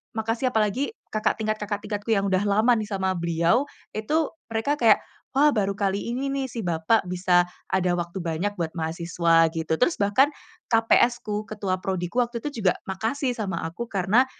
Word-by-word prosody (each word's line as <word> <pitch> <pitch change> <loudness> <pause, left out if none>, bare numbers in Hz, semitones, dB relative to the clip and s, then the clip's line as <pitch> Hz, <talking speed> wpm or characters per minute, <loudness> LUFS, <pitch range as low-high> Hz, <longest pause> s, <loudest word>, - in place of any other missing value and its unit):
makasih. 225 +3 -1
Apalagi 220 - 0 0.2
kakak 215 0 +1
tingkat 215 0 -1
kakak 205 0 -3
tingkatku 210 +1 -5
yang 195 - +1
udah 185 +2 +2
lama 215 +5 +3
nih 215 -1 -3
sama 190 -1 0
beliau 170 - +2 0.3
itu 300 +9 +1 0.2
mereka 225 +6 0
kayak, 225 -3 +6 0.4
“Wah, 295 +2 +6
baru 200 -1 +1
kali 200 +3 -1
ini 270 +2 -2
nih, 275 -1 -1
si 230 - -4
Bapak 170 +5 +2
bisa 180 -1 +3 0.3
ada 185 -1 +2
waktu 175 +2 -4
banyak 170 +5 -1
buat 160 -1 -1
mahasiswa,” 165 0 +2
gitu. 160 0 -1
Terus 330 +7 +3
bahkan 205 +8 +4 0.4
KPS-ku, 225 -2 +2
ketua 200 -3 -2
prodi-ku 185 +4 -2
waktu 235 0 -5
itu 290 -6 -4
juga 180 - +4
makasih 230 +7 -1
sama 190 -7 -3
aku 175 +9 -5
karena 205 +6 +3
205 Hz, 170 wpm, -25 LUFS, 180-230 Hz, 0.4 s, kayak